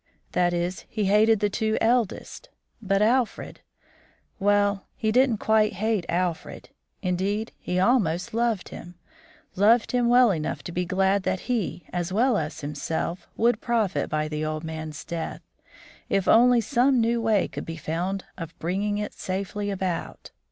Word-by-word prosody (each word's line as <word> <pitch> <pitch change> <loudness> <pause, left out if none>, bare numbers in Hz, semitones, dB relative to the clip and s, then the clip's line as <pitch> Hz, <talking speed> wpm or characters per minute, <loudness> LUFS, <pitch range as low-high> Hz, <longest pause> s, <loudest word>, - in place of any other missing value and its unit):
That 175 -1 +2
is, 175 +1 -2
he 215 -2 -1
hated 215 +2 +4
the 205 - +2
two 220 +1 0
eldest; 240 - -1 0.3
but 195 -1 +1
Alfred 240 +1 0 0.8
well, 205 0 +2
he 220 -1 0
didn't 250 -1 +3
quite 215 0 +2
hate 210 -1 -1
Alfred; 175 -1 -2 0.3
indeed, 195 +4 -1
he 180 - -3
almost 185 -5 +1
loved 230 -4 0
him, 175 +1 -10 0.6
loved 220 +5 +4
him 245 -1 +2
well 245 -2 +6
enough 155 -4 -3
to - - -6
be 180 +1 -1
glad 190 +2 +2
that 185 - -2
he, 220 -9 -2
as 175 0 -2
well 240 +5 +3
as 155 +1 -5
himself, 160 +4 -3
would 235 -1 +2
profit 225 -6 0
by 155 0 -1
the 155 0 -3
old 155 0 -3
man's 160 -1 -6
death, 170 -1 -5 0.7
if 195 -1 +1
only 245 +1 +6
some 255 +3 +2
new 230 +1 +1
way 220 -3 +2
could - - -7
be 165 0 -5
found 175 +5 -3
of 165 -1 -7
bringing 200 +5 -1
it 210 0 -4
safely 200 +2 -4
about. 190 -3 -4
200 Hz, 155 wpm, -25 LUFS, 175-225 Hz, 0.8 s, well